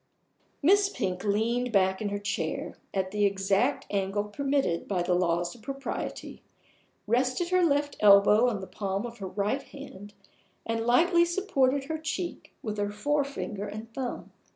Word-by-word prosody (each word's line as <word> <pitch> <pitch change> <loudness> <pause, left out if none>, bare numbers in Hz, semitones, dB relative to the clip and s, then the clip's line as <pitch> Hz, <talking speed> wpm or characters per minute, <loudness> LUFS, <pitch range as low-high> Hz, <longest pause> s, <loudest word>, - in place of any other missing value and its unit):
Miss 395 +5 +5
Pink 185 - -3
leaned 230 +4 0
back 190 -2 +2
in 210 - -1
her 205 - -2
chair, 200 0 -3 0.2
at 190 -1 -1
the 210 0 0
exact 200 +6 +1
angle 200 0 0
permitted 270 -4 -1
by 185 -3 0
the 180 - +1
laws 175 -1 +1
of 235 - -16
propriety; 275 +3 -5 0.6
rested 255 +9 +1
her 365 0 +3
left 290 -2 +1
elbow 210 +3 +6
on 205 -5 -3
the - - -5
palm 195 +2 -3
of 235 -1 -8
her 195 - -4
right 205 +8 -1
hand, 205 -8 -11 0.5
and 225 0 -2
lightly 340 +8 +5
supported 285 -7 +1
her 315 +3 -4
cheek 330 +2 -4
with 215 -2 -3
her 205 0 0
forefinger 275 -4 -2
and 220 +2 -8
thumb. 255 -1 -5
220 Hz, 155 wpm, -28 LUFS, 200-280 Hz, 0.6 s, elbow